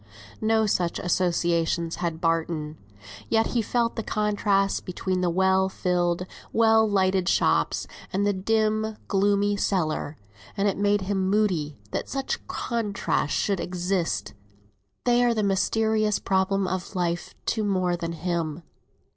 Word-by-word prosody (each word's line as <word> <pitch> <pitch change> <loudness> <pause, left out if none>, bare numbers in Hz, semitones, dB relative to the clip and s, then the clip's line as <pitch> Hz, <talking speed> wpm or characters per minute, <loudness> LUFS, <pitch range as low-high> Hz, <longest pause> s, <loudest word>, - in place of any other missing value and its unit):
No 220 0 +3
such 180 -4 0
associations 170 -2 0
had 170 -2 -2
Barton; 165 -2 -1 0.5
yet 225 0 +3
he 240 - +2
felt 230 +1 0
the 225 - -2
contrast 205 -2 +1
between 185 0 -2
the 180 - +2
well 190 +2 +3
filled, 180 -1 0 0.3
well 225 -1 +4
lighted 190 -2 +2
shops 80 0 +2 0.3
and 200 +2 0
the 205 - +2
dim 215 +2 0
gloomy 205 +1 +2
cellar, 160 -6 -1 0.4
and 200 +1 +2
it 195 - +1
made 205 0 +2
him 190 -1 -1
moody 185 -8 +1
that - - -3
such 270 0 -2
contrasts 210 - -1
should 200 -3 0
exist. 175 - -2 0.7
They 245 0 +3
are 240 -1 +3
the 215 - 0
mysterious 215 +2 +1
problem 190 0 +1
of 185 +1 -4
life 175 -1 -2 0.2
to 220 - -1
more 185 -3 +1
than 170 -1 -4
him. 170 -1 -3
190 Hz, 135 wpm, -25 LUFS, 175-210 Hz, 0.7 s, well